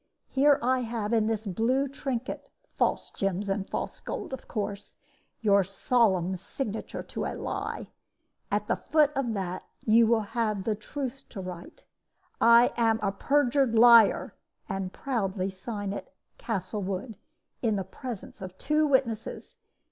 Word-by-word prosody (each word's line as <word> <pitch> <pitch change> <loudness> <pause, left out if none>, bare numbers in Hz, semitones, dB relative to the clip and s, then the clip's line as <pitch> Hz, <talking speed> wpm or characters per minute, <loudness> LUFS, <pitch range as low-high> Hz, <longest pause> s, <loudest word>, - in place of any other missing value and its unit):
Here 280 +1 +5
I 255 +1 +3
have, 230 -2 -2
in 220 -2 +3
this 220 -1 -1
blue 235 +8 +1
trinket 265 -2 -4 0.3
(false - - 0
gems 195 +1 -2
and 195 0 -2
false - - -4
gold, - - -5
of 265 - -7
course), 205 -2 -4 0.4
your 200 -3 +4
solemn 190 -2 +2
signature 220 +3 -5
to - - -4
a - - -3
lie. - - -4 0.6
At 210 0 +1
the - - 0
foot 300 -1 +3
of 245 -4 0
that 185 -2 -3 0.2
you 225 +1 +5
will 230 -1 +3
have 215 -4 0
the 220 - +1
truth 265 +5 -6
to 205 - -8
write, 180 -2 -8 0.6
"I 235 +1 +7
am 225 -2 +3
a 200 - +2
perjured 275 +2 +2
liar!" 230 -1 +7 0.3
and 195 -3 -3
proudly 195 -8 -2
sign 200 +1 -5
it - - -7 0.3
"Castlewood," 205 0 -3 0.5
in 225 -3 +1
the 195 - -1
presence 215 +3 -8
of 185 -1 -8
two 305 +1 +2
witnesses. 260 - -1
220 Hz, 145 wpm, -28 LUFS, 195-250 Hz, 0.6 s, I